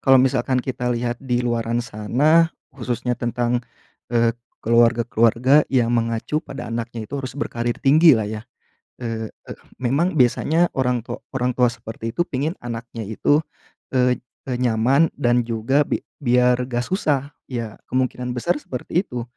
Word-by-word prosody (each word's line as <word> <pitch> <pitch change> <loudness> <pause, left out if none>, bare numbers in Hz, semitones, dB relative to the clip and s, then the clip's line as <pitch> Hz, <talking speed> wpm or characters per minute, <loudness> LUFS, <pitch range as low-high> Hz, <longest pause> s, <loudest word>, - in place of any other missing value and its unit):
kalau 135 -1 +6
misalkan 130 0 +2
kita 125 -1 -3
lihat 120 0 -2
di 125 -2 0
luaran 120 0 0
sana, 140 +10 +3 0.2
khususnya 125 0 -2
tentang, 120 0 0 0.5
eee, 115 -1 +2 0.3
keluarga-keluarga 115 +3 +4
yang 120 -3 +2
mengacu 115 +5 0
pada 125 -7 -8
anaknya 115 -1 -4
itu 140 +6 -5
harus 130 0 -6
berkarir 120 -4 -2
tinggi 150 0 +7
lah 110 - -1
ya. 105 +1 -4 0.6
Eee, 115 -2 -4 0.5
memang 145 +7 +1
biasanya 160 +7 +3
orang 125 -3 0
tua - - -6
orang 125 -1 0
tua 125 -1 +4
seperti 115 0 -7
itu 175 +9 -1
pengen 145 +6 -2
anaknya 115 -2 -6
itu, 130 +7 +2 0.6
eee, 125 -1 +3 0.3
e - - -1
nyaman 125 +6 +3
dan 120 -3 +1
juga 120 +6 +1
bi - - -2 0.2
biar 125 -2 +3
enggak 120 -1 -1
susah. 145 -4 0 0.2
Ya, 115 -5 -5
kemungkinan 125 -1 -1
besar 170 +8 0
seperti 150 +7 -2
itu. 120 -1 -4
125 Hz, 145 wpm, -22 LUFS, 115-135 Hz, 0.6 s, tinggi